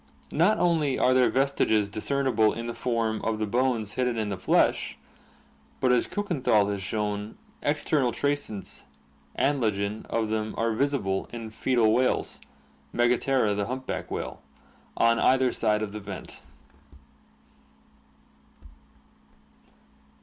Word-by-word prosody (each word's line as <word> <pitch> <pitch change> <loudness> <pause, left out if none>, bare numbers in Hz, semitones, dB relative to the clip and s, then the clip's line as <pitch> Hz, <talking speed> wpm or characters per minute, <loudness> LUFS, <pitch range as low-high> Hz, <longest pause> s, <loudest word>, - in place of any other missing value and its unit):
Not 175 +8 +3
only 160 -6 +2
are 130 - +3
their 130 -1 +4
vestiges 130 -6 +2
discernible 110 +1 +1
in 115 - -5
the 120 - -4
form 115 -3 -1
of 110 -1 -1
the 110 - -1
bones 115 -1 0
hidden 125 -1 -1
in 110 -2 -1
the 100 - -2
flesh, - - +2 0.8
but 130 - +3
as 125 - +3
Kukenthal 135 - +1
has 100 -1 -3
shown, 105 +1 -3 0.2
external 145 -3 +1
traces 140 -9 -2 0.5
(Anlagen) 110 -6 0
of 110 -1 -1
them 110 0 -2
are 115 0 +1
visible 110 -7 -1
in 115 -2 -7
foetal 115 -1 +2
whales 130 +2 0 0.5
(Megaptera, 120 -2 +2
the 100 0 -2
humpback 130 +2 -4
whale) - - -5 0.6
on 115 0 +4
either 130 -1 +3
side 105 -1 +1
of 105 - -4
the 105 - -6
vent. 100 -1 -8
115 Hz, 120 wpm, -27 LUFS, 105-130 Hz, 0.8 s, their